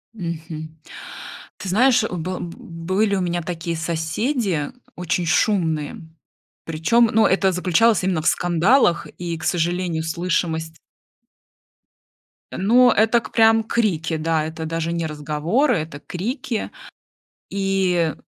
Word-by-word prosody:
Мгм. 160 -4 -6 0.8
Ты 195 - -6
знаешь, 245 +4 +4
был 180 +1 -4
б 170 -1 -6
были 185 +5 -1
у 190 - 0
меня 175 -1 -1
такие 170 0 -4
соседи, 165 - -1 0.2
очень 180 0 -1
шумные. 165 -4 +1 0.7
Причём, 220 +9 +2
ну, 220 0 +5
это 190 0 +2
заключалось 185 +4 +2
именно 180 -4 0
в - - -2
скандалах. 175 +2 +3
И, 170 -2 -4
к 165 - -10
сожалению, 175 -1 0
слышимость. 165 -1 -2 1.8
Ну, 240 +6 +4
это 220 +2 +3
к - - -11
прям 225 0 +4
крики, 175 -9 0
да, 160 0 0
это 160 0 -5
даже 165 +1 -2
не 170 -1 -2
разговоры, 155 - 0
это 155 -2 -5
крики. 220 - -4 0.8
И 190 -4 +1
175 Hz, 120 wpm, -21 LUFS, 160-205 Hz, 1.8 s, ну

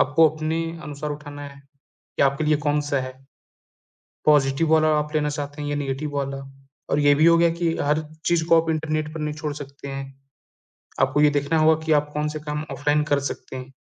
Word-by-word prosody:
आपको 155 +4 +5
अपने 155 +1 -2 0.2
अनुसार 150 0 -5
उठाना 145 -1 -7
है, 140 0 -14 0.6
कि - - +3
आपके 140 +2 +2
लिए 150 0 +3
कौन-सा 145 -1 +1
है। 130 0 -5 1.1
पॉज़िटिव 145 +1 +3
वाला 155 0 +5
आप 150 +1 -3
लेना 150 -1 +1
चाहते 145 0 -5
हैं 145 - -3
या 145 - -1
नेगेटिव 145 +1 -3
वाला 140 -1 -2 0.5
और - - +2
ये 145 -1 +5
भी 150 +2 +3
हो 170 0 +7
गया 170 0 +5
कि 165 0 -1
हर 150 +2 +1 0.3
चीज़ 170 -2 +2
को 165 -1 +6
आप 165 - -7
इंटरनेट 155 -1 -2
पर 160 - -5
नहीं 150 0 -2
छोड़ 150 -1 -4
सकते 140 -1 -9
हैं। 135 0 -4 1.0
आपको 145 - +2
ये 150 0 +6
देखना 145 +2 0
होगा 155 0 +5
कि 160 - +1
आप 150 0 -3
कौन-से 150 +1 -2
काम 150 0 -4
ऑफलाइन 145 +1 +1
कर 145 -1 +1
सकते - - -8
हैं, 130 +1 -8
150 Hz, 205 wpm, -23 LUFS, 145-155 Hz, 1.1 s, हो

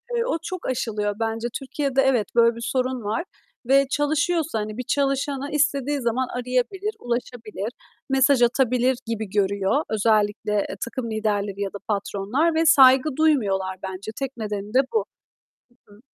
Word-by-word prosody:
eee, 470 - +1
o 330 - 0
çok 370 0 -5
aşılıyor 210 -5 -1
bence. 225 +1 -1
Türkiye'de 270 0 -1
evet, 250 -7 +2
böyle 235 0 +5
bir 235 - -8
sorun 255 -2 -1
var 215 +9 -1 0.4
ve 275 0 +4
çalışıyorsa, 305 -2 0
hani, 210 +1 -5
bir 250 - -3
çalışanı 275 +1 -1
istediği 290 -1 +1
zaman 245 +2 0
arayabilir, 255 - -2
ulaşabilir, 235 -3 -4 0.4
mesaj 270 -1 +4
atabilir 250 +1 +2
gibi 220 -3 -3
görüyor. 200 +7 +1
Özellikle, 210 -1 +1 0.2
eee, 190 - -5
takım 235 0 -5
liderleri 205 -2 -1
ya 195 0 -3
da - - -5
patronlar 210 +10 0
ve 325 +1 +2
saygı 265 -2 +6
duymuyorlar 200 -12 +1
bence. 190 +3 -6
Tek 270 -2 -4
nedeni 210 -1 -5
de 260 - +5
bu. 445 - +1 0.8
Hı 205 - -18
hı. 205 - -18
245 Hz, 155 wpm, -23 LUFS, 210-275 Hz, 0.8 s, saygı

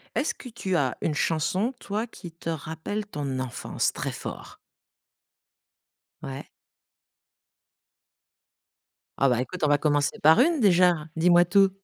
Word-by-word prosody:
Est-ce - - 0
que 255 - -12
tu 195 -6 -2
as 130 -6 0
une 155 - 0
chanson, 170 - 0
toi, 215 +1 -3
qui 175 -6 -11
te 165 0 -7
rappelle 160 +6 -4
ton 145 -9 -4
enfance, 130 -2 -2
très - - -4
fort? - - -8 1.7
Ouais. 135 +1 -6 2.7
Ah 135 - +3
bah 125 -1 +1
écoute, 175 +6 -6
on 150 - +3
va 145 - +4
commencer 145 -1 0
par 160 +8 +6
1 325 +3 +3
déjà! 180 -6 +4
Dis-moi 175 +1 +5
tout. 195 +2 +4
165 Hz, 130 wpm, -26 LUFS, 145-195 Hz, 2.7 s, par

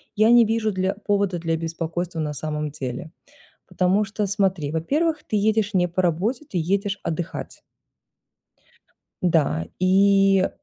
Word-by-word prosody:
я 215 +1 +4
не 240 -1 +7
вижу 220 0 0
дл 185 0 0
повода 200 -3 +1
для 165 -1 -1
беспокойства 165 +1 -4
на 150 -1 -2
самом 150 +1 -3
деле. 145 +4 -6 0.6
Потому 185 +3 +2
что, 205 +1 -3
смотри, 190 -7 0
во-первых, 300 - 0
ты 215 - -2
едешь 215 0 +1
не 180 -1 +3
по 180 +2 -1
работе, 195 - 0
ты 180 - -3
едешь 200 +4 -1
отдыхать. 165 +2 -5 1.6
Да, 150 - +2
и 195 +1 +4
185 Hz, 135 wpm, -23 LUFS, 165-205 Hz, 1.6 s, не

